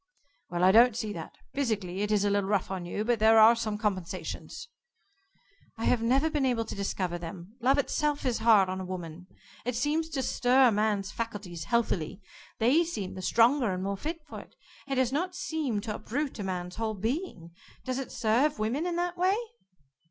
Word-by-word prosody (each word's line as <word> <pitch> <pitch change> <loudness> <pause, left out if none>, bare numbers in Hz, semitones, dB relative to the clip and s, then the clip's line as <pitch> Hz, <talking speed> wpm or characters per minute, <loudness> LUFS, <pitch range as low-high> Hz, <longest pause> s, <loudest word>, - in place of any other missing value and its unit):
"Well, 175 0 -1
I 185 - +7
don't 235 +2 +6
see 215 -3 -3
that. 165 -4 -8 0.2
Physically 205 -9 -2
it 210 0 -1
is 205 -1 +2
a 205 - +2
little 200 -1 0
rough 200 -2 0
on 180 -2 -4
you, 210 +4 -3
but 240 -1 +1
there 220 +1 +6
are 220 +2 +8 0.2
compensations." 190 -6 -4 1.1
"I 225 - -3
have 245 - +2
never 265 +7 +3
been 300 -3 -1
able 245 -3 +1
to - - -6
discover 185 -3 -2
them. 175 +4 -9
Love 265 +4 +3
itself 290 +1 0
is 245 -3 0
hard 220 -4 +5
on 185 0 -3
a - - -4
woman. 180 -1 -7 0.4
It 245 0 -2
seems 300 +6 0
to 275 -4 -2
stir 255 +1 +4
a - - +1
man's 210 -2 0
faculties 200 -8 -5
healthily. 195 -5 0 0.4
They 265 +9 +4
seem 215 - -5
the 185 - -7
stronger 235 +3 +3
and 185 0 -3
more 200 +1 -1
fit 315 - -5
for - - -8
it. - - -15 0.3
It 275 - -1
does 260 -1 +2
not 360 +5 -1
seem 315 - -2
to 215 0 -4
uproot 265 +6 -4
a - - -3
man's 180 -1 -4
whole 220 -1 -2
being. 220 - -4 0.3
Does 255 0 -2
it 270 - -6
serve 250 +6 +1
women 250 +11 -1
in 345 - -2
that 350 0 -2
way?" 375 +2 +3
225 Hz, 195 wpm, -29 LUFS, 195-270 Hz, 1.1 s, are